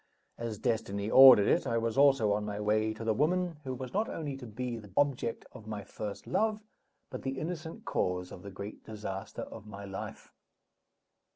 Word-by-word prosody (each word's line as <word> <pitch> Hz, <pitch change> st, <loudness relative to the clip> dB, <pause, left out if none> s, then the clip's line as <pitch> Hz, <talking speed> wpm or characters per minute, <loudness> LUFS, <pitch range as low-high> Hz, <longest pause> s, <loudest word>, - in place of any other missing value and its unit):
As 115 Hz, -2 st, -4 dB
destiny 105 Hz, -3 st, -1 dB
ordered 130 Hz, -6 st, +10 dB
it, -, -, +2 dB
I 115 Hz, -, +1 dB
was 115 Hz, -1 st, -1 dB
also 135 Hz, -6 st, +5 dB
on 105 Hz, +1 st, +1 dB
my 105 Hz, 0 st, -4 dB
way 110 Hz, +1 st, +2 dB
to 110 Hz, +1 st, -7 dB
the 110 Hz, -1 st, +2 dB
woman 170 Hz, +6 st, +1 dB
who 130 Hz, -1 st, -3 dB
was 130 Hz, 0 st, -7 dB
not 215 Hz, +3 st, +1 dB
only 145 Hz, -4 st, -4 dB
to 125 Hz, -3 st, -9 dB
be 120 Hz, +2 st, -4 dB
the 105 Hz, -2 st, -12 dB
object 140 Hz, -5 st, +1 dB
of 110 Hz, -, -12 dB
my 105 Hz, -2 st, -5 dB
first 105 Hz, 0 st, -6 dB
love, 215 Hz, +2 st, 0 dB, 0.5 s
but -, -, -5 dB
the 135 Hz, 0 st, -3 dB
innocent 160 Hz, +2 st, -5 dB
cause 90 Hz, 0 st, -1 dB
of -, -, -9 dB
the 100 Hz, -, -8 dB
great 100 Hz, +2 st, -8 dB
disaster 105 Hz, -3 st, -6 dB
of 110 Hz, -1 st, -10 dB
my 100 Hz, -1 st, -8 dB
life. 95 Hz, -1 st, -7 dB
115 Hz, 190 wpm, -31 LUFS, 105-135 Hz, 0.5 s, ordered